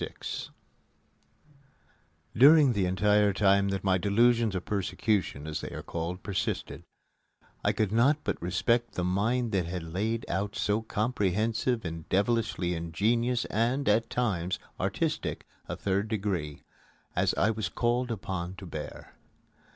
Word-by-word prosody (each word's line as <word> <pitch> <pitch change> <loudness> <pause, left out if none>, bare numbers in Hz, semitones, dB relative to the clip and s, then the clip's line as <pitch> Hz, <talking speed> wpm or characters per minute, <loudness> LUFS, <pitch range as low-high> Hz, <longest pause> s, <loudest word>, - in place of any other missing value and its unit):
VI - - -3 2.3
During 140 +1 +7
the 100 -4 +1
entire 105 +2 +3
time 100 0 +3
that 95 0 -2
my 95 -1 +2
delusions 115 +2 +3
of 90 - -3
persecution, 100 -6 -1
as 80 -1 -4
they - - -5
are - - -7
called, 85 +2 -4
persisted, 100 -3 -3 0.8
I - - +3
could 105 -3 0
not 125 +7 +4
but - - -2
respect 100 +6 0
the 90 - -1
mind 110 +6 0
that 95 -5 0
had 90 0 -4
laid 105 +8 -2
out 100 +3 -2
so 105 +2 0
comprehensive 110 +1 0
and 80 -1 -6
devilishly 100 -3 +1
ingenious 115 +9 0
and, 120 +6 0
at 110 +2 +3
times, 95 -7 -1 0.2
artistic - - -2 0.2
a - - -2
Third 100 +2 -1
Degree 95 -9 -3 0.5
as - - +2
I 105 - +3
was 110 -4 -3
called 120 +3 0
upon 95 -4 -4
to 95 - -9
bear. 75 -4 -8
100 Hz, 135 wpm, -29 LUFS, 90-115 Hz, 2.3 s, During